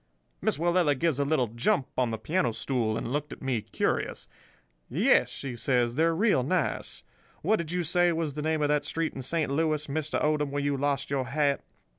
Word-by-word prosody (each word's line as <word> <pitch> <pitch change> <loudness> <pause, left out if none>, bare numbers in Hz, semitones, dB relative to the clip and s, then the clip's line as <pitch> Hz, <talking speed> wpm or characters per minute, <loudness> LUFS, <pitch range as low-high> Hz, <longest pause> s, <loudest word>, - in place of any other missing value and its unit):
"Miss - - +1
Willella 170 -3 +2
gives 160 -2 +1
a - - +3
little 140 -3 +2
jump 120 +4 +1
on 125 -2 +1
the 110 - -2
piano 125 0 0
stool, 115 -3 -1
and 115 - -4
looked 150 0 -2
at - - -8
me 130 -4 0
curious. - - -2 0.6
"'Yes,' - - +3 0.3
says 120 -2 +1
she, - - -10
'they're 165 +2 +3
real 200 - +3
nice. 165 +7 -2 0.4
What 215 +7 +3
did 170 -1 -4
you 180 0 0
say 175 +2 +3
was 160 -3 -2
the 150 - -4
name 155 0 0
of - - +3
that 150 -1 +2
street 165 +2 -2
in 135 - -6
Saint 150 +2 -1
Louis, 155 0 +1
Mr. 155 +1 -2
Odom, 150 -1 +1
where 145 0 -2
you 145 0 +1
lost 140 0 -1
your 135 -2 0
hat? 140 +1 0
145 Hz, 205 wpm, -28 LUFS, 130-160 Hz, 0.6 s, a